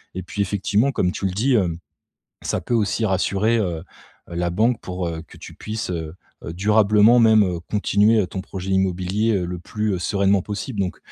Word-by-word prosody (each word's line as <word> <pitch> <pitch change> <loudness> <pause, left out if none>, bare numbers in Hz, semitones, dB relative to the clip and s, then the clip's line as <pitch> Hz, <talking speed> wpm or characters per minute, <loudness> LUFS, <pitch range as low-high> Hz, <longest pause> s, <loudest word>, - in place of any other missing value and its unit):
et 95 - -4
puis 100 +3 -4
effectivement 100 +6 +1
comme 90 -8 0
tu 100 - -5
le 95 - 0
dis, 125 +8 +1
hem, 90 -7 +1 0.6
ça - - -2
peut - - -4
aussi 110 0 +1
rassurer, 100 +3 +1
heu 85 -6 -2 0.5
heu, 85 - -8
la 85 0 0
banque 110 +7 +1
pour, 90 -1 -4
heu, 80 -1 -4
que - - -15
tu - - -11
puisses, 110 -3 -5
heu 80 -2 -5 0.3
heu, 80 - -5
durablement 105 +4 +4
même, 110 -2 +6
heu, 90 -3 -2
continuer, 105 +4 +2
heu, 95 - -2
ton 95 - -5
projet 95 0 -6
immobilier, 95 +3 0
heu, 90 -2 -1
le 90 0 -5
plus, 105 +4 -3
heu, 90 - -2
sereinement 100 +1 +1
possible. 105 +3 -5
Donc 90 - -3
100 Hz, 205 wpm, -22 LUFS, 90-110 Hz, 0.6 s, même